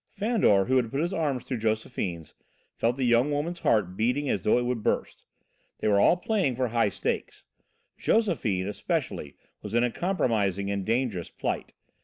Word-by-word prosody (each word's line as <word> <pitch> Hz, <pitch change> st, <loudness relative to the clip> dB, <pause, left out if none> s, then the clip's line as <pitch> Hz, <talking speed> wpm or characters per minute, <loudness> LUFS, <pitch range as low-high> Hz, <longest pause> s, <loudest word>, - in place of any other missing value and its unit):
Fandor, 205 Hz, -, +2 dB
who 130 Hz, +1 st, +2 dB
had 120 Hz, -3 st, +1 dB
put 135 Hz, -, -2 dB
his 170 Hz, +4 st, -1 dB
arm 150 Hz, -7 st, 0 dB
through 125 Hz, 0 st, -4 dB
Josephine's, 105 Hz, -7 st, -2 dB, 0.4 s
felt 120 Hz, +3 st, 0 dB
the 135 Hz, -, -1 dB
young 120 Hz, +3 st, +4 dB
woman's 155 Hz, +4 st, -2 dB
heart 95 Hz, -5 st, +1 dB
beating 125 Hz, +7 st, 0 dB
as 100 Hz, -, -1 dB
though 105 Hz, -, +3 dB
it 120 Hz, -, 0 dB
would 120 Hz, -2 st, -1 dB
burst. -, -, -1 dB, 0.5 s
They -, -, -2 dB
were 100 Hz, -1 st, +4 dB
all 170 Hz, -, +5 dB
playing 180 Hz, -, 0 dB
for 125 Hz, 0 st, 0 dB
high 115 Hz, -2 st, +2 dB
stakes. -, -, -3 dB, 0.6 s
Josephine, 130 Hz, -, +1 dB
especially, 75 Hz, -7 st, -3 dB, 0.3 s
was 105 Hz, +1 st, -5 dB
in 120 Hz, -, +4 dB
a 125 Hz, -, +1 dB
compromising 105 Hz, -, 0 dB
and 100 Hz, -1 st, -2 dB
dangerous 115 Hz, -5 st, -1 dB
plight. -, -, -4 dB
120 Hz, 175 wpm, -27 LUFS, 100-145 Hz, 0.6 s, all